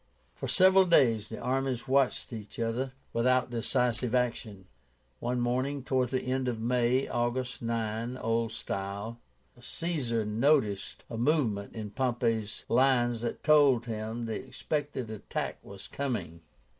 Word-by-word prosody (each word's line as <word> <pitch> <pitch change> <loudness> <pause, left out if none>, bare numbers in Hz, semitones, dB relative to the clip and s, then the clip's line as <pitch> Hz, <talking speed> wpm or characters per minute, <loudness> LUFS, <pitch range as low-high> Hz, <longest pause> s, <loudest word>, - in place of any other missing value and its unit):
For - - -5
several 190 0 +6
days 120 - +4
the - - -6
armies 130 -1 -1
watched 135 -2 +1
each 105 -2 -8
other 120 +3 -1 0.2
without 125 +2 +2
decisive 120 +1 0
action. 115 -6 -1 0.5
One 125 +1 -1
morning 130 +3 0
towards 130 -2 0
the 130 -1 0
end 130 0 -1
of 120 -3 -1
May 125 +2 +2
(August 120 +1 -2
9, 115 +1 -2
old 115 -1 0
style) 100 +1 -4 0.4
Caesar 125 -6 -2
noticed 110 -2 +1
a 115 - -6
movement 120 -8 +1
in 105 -2 -5
Pompey's 115 -3 -1
lines 120 -2 +3
that 120 - -4
told 140 -6 +5
him 110 +1 -4
the 115 - -4
expected 145 -6 -3
attack 110 - -4
was 100 -1 -10
coming. 100 - -4
120 Hz, 130 wpm, -30 LUFS, 110-130 Hz, 0.5 s, several